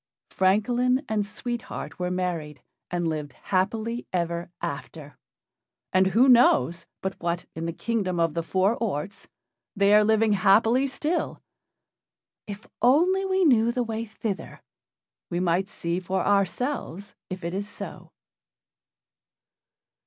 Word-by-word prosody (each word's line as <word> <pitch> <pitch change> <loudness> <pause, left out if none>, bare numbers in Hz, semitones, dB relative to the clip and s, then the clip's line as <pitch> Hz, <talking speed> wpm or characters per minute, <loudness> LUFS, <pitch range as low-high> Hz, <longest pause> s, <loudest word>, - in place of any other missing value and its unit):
Francolin 245 +8 +2
and 215 -1 0
Sweet 240 +3 -4
Heart 150 +4 -7
were 180 0 -1
married, 170 -7 -3 0.3
and 175 -1 -1
lived 150 -3 -3
happy 220 - -2
ever 170 -1 -2
after, 150 -2 -6 0.8
and 185 0 +4
who 230 +7 +4
knows 170 - +4 0.2
but 190 0 -1
what, 170 0 -2
in 165 +1 -4
the - - -1
Kingdom 190 -2 -2
of 165 -2 +2
the 170 - -1
Four 190 +5 +1
Orts, 200 -3 -4 0.5
they 200 +1 +4
are 210 0 +7
living 220 0 +3
happily 220 +7 +4
still? 305 +5 -2 1.1
If 205 0 -8
only 350 +10 +4
we 380 -1 +2
knew 235 -5 +4
the 245 +1 -1
way 225 -1 -3
thither, 215 -2 -6 0.7
we 175 - -1
might 180 +1 +1
see 170 -3 -3
for 185 +1 -2
ourselves 200 - -1 0.2
if 185 -1 -6
it 170 +1 -3
is 200 +2 -3
so. - - -8
195 Hz, 130 wpm, -26 LUFS, 175-230 Hz, 1.1 s, are